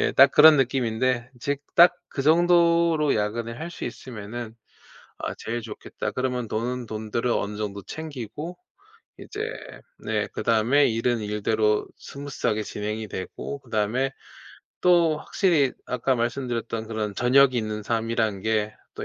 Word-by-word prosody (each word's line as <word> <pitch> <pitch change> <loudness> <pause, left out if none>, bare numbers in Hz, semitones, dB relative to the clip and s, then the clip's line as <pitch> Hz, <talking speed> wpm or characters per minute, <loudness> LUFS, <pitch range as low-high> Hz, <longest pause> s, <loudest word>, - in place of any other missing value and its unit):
예 - - +1
딱 135 +1 +7
그런 150 0 +8
느낌인데 125 -1 0
즉 140 +2 -2
'딱 175 +1 +7 0.2
그 - - -4
정도로 170 0 +4
야근을 115 +2 -2
할 160 +2 -5
수 - - -7
있으면은 115 -1 -7 0.7
아 - - -3
제일 120 +2 -4
좋겠다.' 110 -1 -6
그러면 125 -3 -2
돈은 120 +3 -2
돈대로 110 +2 -1
어느 105 0 -4
정도 100 -1 -4
챙기고 150 - -7 0.6
이제 415 - -8 0.6
네 - - -1
그다음에 115 +6 +2
일은 115 +1 0
일대로 105 0 0
스무스하게 140 -6 -3
진행이 105 +1 -4
되고 100 +8 -6
그다음에 120 +2 -1 0.7
또 170 -3 +4
확실히 155 -7 +2
아까 125 +1 0
말씀드렸던 120 -2 -2
그런 110 -2 -3
저녁이 130 +3 +4
있는 110 -1 -2
삶이란 115 -2 -1
게 110 0 0 0.2
또 - - -5
120 Hz, 295 characters per minute, -25 LUFS, 110-140 Hz, 0.7 s, 그런